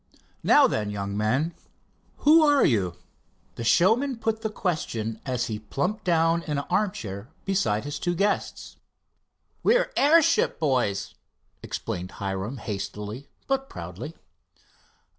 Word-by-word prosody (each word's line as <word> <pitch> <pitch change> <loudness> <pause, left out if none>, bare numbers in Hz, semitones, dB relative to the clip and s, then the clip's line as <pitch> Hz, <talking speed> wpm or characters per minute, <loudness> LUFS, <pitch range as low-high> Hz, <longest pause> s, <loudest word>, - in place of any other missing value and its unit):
Now - - +6
then, 105 -1 0
young 100 -1 -4
men, 130 +11 0 0.7
who 315 +3 +8
are 290 -2 +5
you?" 95 - +1 0.6
The 115 - -6
showman 225 - +3
put 225 -1 -1
the 220 - -1
question 115 - -3
as 125 -1 0
he 110 -3 -4
plumped 180 - -3
down 165 -1 +3
in 150 -3 -3
an 140 - -1
armchair 120 - -2 0.2
besides 120 - 0
his 145 +1 -4
two 175 0 -1
guests. 200 +4 -1 0.8
"We're - - +3
airship 310 +2 +4
boys," 125 -10 0 0.5
explained 90 +1 -5
Hiram 100 +6 -4
hastily, 105 +4 -5 0.2
but 270 0 -1
proudly. - - -7
145 Hz, 125 wpm, -26 LUFS, -, 0.8 s, who